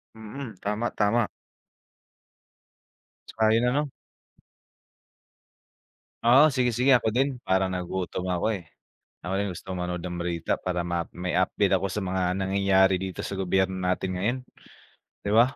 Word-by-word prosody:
Mm, 110 +2 -8
tama, 105 +3 -1
tama. 105 +2 +2 2.0
Tsaka 110 -1 +2
'yung 120 +2 +3
ano 145 +4 +1 2.4
Oo, 130 +6 +7
sige, 125 -1 +2
sige 125 +3 +4
ako 110 -2 +1
din. 135 +3 +1
Parang 95 0 +2
nagutom 90 0 -3
ako, 90 +2 -1
eh, 90 - -8 0.6
ako 90 +2 -3
din 100 - 0
gusto 95 - -8
manood 90 -1 -3
ng 90 -1 -4
balita 85 -1 -1
para 90 -1 -2
ma 85 -1 -2
may 90 0 -3
update 95 +2 +1
ako 95 +1 +2
sa 100 +2 -3
mga 90 -1 0
nangyayari 95 -1 +3
dito 95 -1 -5
sa 100 - -4
gobyerno 95 0 +1
natin 90 +1 -1
ngayon, 120 +7 0 0.9
di 100 - -1
ba? 120 +4 +4
95 Hz, 140 wpm, -26 LUFS, 90-110 Hz, 2.4 s, Oo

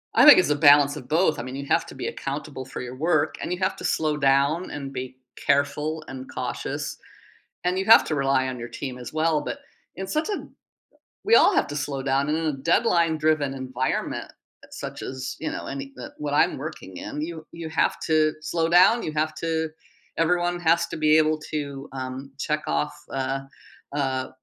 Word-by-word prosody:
I - - +7
think 295 - +11
it's 185 - +2
a 150 - +3
balance 145 -1 +6
of 135 -4 -9
both. 160 0 +2
I - - -3
mean, 130 +1 -6
you 140 +1 -5
have - - +2
to - - -10
be - - -4
accountable 135 -1 -5
for 130 - -7
your 125 0 -7
work, 155 +1 +1
and - - -4
you 180 - -2
have 190 0 0
to - - -9
slow 155 -1 0
down, 140 +5 +2
and 140 -2 -6
be 130 0 -6 0.2
careful 150 +3 0
and 130 0 -8
cautious. - - -4 0.7
And 180 +1 +1
you 190 - 0
have 225 +3 +8
to 155 - -1
rely 135 -1 +2
on 130 -1 -5
your 120 0 -6
team 125 +1 -6
as 125 - -8
well. 155 0 +2
But, 280 - -5 0.4
in 190 - -4
such 310 - -1
a 410 - -4 0.8
we 445 +3 +5
all - - +6
have - - +3
to 145 - -5
slow 140 -1 -3
down 135 +1 +1
and 155 +1 +1
in 165 - -2
a 155 - +1
deadline-driven 155 - +2
environment 130 -1 -3 0.4
such - - -7
as, 130 0 -5
you 160 - -2
know, - - -5
any 135 0 -6
n 120 - -7
what 145 -1 -3
I'm 150 - +3
working 135 - -7
in, 150 - -5
you 160 -1 -6
you 165 -1 -6
have - - +1
to 155 -1 +3
slow 165 +1 -1
down, 185 +7 +6
you - - -3
have 155 0 0
to 160 -1 -1 0.5
everyone 175 +1 +1
has 170 0 +3
to - - -5
be 155 0 +4
able 155 0 +3
to, 140 -2 -4
um, 130 +1 -6
check-off, 105 - -1 0.2
uh, 135 0 -1 0.6
uh, 130 -2 -1
150 Hz, 200 wpm, -25 LUFS, 135-160 Hz, 0.8 s, think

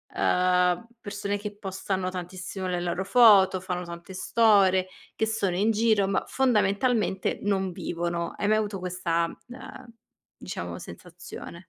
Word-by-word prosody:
uhm, 180 +3 +2
persone 205 -1 -3
che 205 0 -7
postano 190 -1 -3
tantissimo 185 +1 -6
le 180 -1 -2
loro 180 +2 -2
foto, 200 -5 +6
fanno 180 -1 -4
tante 170 +2 -9
storie, 195 -3 +3 0.3
che 220 - 0
sono 200 -5 -1
in 210 +4 +2
giro, 215 -3 +2
ma 195 - 0
fondamentalmente 215 -4 +1
non 195 -2 0
vivono, 170 -1 -3
hai 205 - 0
mai 215 - +4
avuto 205 -3 -2
questa, 180 -2 -1 0.2
uhm, 245 -1 -11 0.5
diciamo - - -6
sensazione? - - -10
190 Hz, 135 wpm, -26 LUFS, 180-210 Hz, 0.5 s, foto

